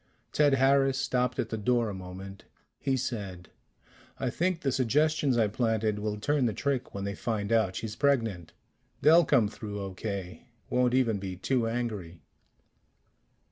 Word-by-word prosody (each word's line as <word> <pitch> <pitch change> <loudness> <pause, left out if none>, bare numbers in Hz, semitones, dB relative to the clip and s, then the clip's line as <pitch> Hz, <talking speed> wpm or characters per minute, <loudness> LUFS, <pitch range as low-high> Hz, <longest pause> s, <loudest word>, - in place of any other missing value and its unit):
Ted 145 -2 +4
Harris 135 0 +3
stopped 125 -2 0
at 115 - -1
the 110 - -3
door 120 +2 +2
a 105 - -4
moment. 95 +1 -9 0.3
He 135 -1 0
said, 100 -8 -5 0.7
"I 130 -2 -1
think 180 +3 0
the 135 - 0
suggestions 140 +2 +2
I 110 -2 +4
planted 110 -1 0
will 105 0 -2
turn 145 +2 +1
the 110 - -2
trick 130 0 -2
when 100 - -3
they 100 0 -2
find 105 0 -3
out 110 -5 +2
she's 110 -1 -4
pregnant. 115 - 0 0.5
They'll 165 +2 +6
come 130 -7 +4
through 105 -1 -6
okay 95 -1 -5 0.2
won't 125 0 +2
even 115 -6 +2
be 95 -1 -5
too 120 +5 0
angry." 110 -8 -4
115 Hz, 155 wpm, -29 LUFS, 100-130 Hz, 0.7 s, They'll